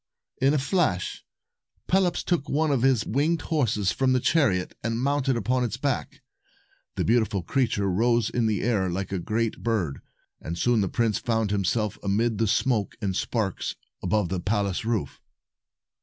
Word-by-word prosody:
266 - - -4
In 140 - +4
a 140 -2 0
flash, 155 - 0 0.6
Pelops 180 -2 +2
took 170 -5 -1
one 155 +1 +1
of 135 -4 +1
his 130 -4 +3
winged 150 +8 +1
horses 110 - +1
from 130 +6 +1
the 130 - +3
chariot, 120 - +1
and 115 0 -1
mounted 135 -1 +1
upon 125 +3 0
its 120 - -2
back. - - -3 0.7
The - - -1
beautiful 110 -5 +1
creature 115 -6 0
rose 115 +4 +2
in 115 -1 0
the 105 -3 0
air 100 -5 +1
like 95 +2 -3
a 95 - -1
great 110 +5 -2
bird, 95 -12 -1 0.4
and 85 +1 -5
soon 120 +4 +2
the 95 - 0
prince 115 -3 0
found 110 -3 0
him 100 -1 +1
self 105 +2 -1
amid 110 +2 0
the 115 - +2
smoke 110 0 +1
and 100 -4 -2
sparks 105 -2 -2 0.3
above 95 0 0
the 95 - -2
palace 100 -1 -1
roof. 110 - -2
115 Hz, 170 wpm, -26 LUFS, 100-130 Hz, 0.7 s, In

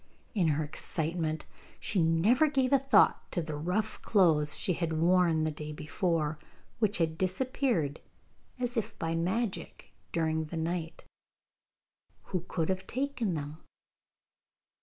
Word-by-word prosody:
In 190 -7 +2
her 155 0 +1
excitement 160 +1 -2 0.3
she 195 - 0
never 185 - +4
gave 270 -3 +1
a 275 - +6
thought 275 0 +3
to - - -1
the 155 -2 -3
rough 180 +8 -2
clothes 155 -7 +3
she 185 - +1
had 165 -1 -2
worn 170 -2 +4
the 155 - 0
day 150 0 -6
before, 155 0 -1 0.4
which 215 -2 +3
had 160 -2 0
disappeared 190 - 0 0.6
as 245 -1 -2
if 220 -1 -2
by 165 0 -1
magic 190 +6 -2 0.2
during 160 -1 0
the 165 +2 -6
night. 165 0 -3 1.3
Who 180 -2 0
could 165 -3 -1
have 190 0 -2
taken 250 -7 -1
them? 150 +1 -5
170 Hz, 135 wpm, -30 LUFS, 160-215 Hz, 1.3 s, a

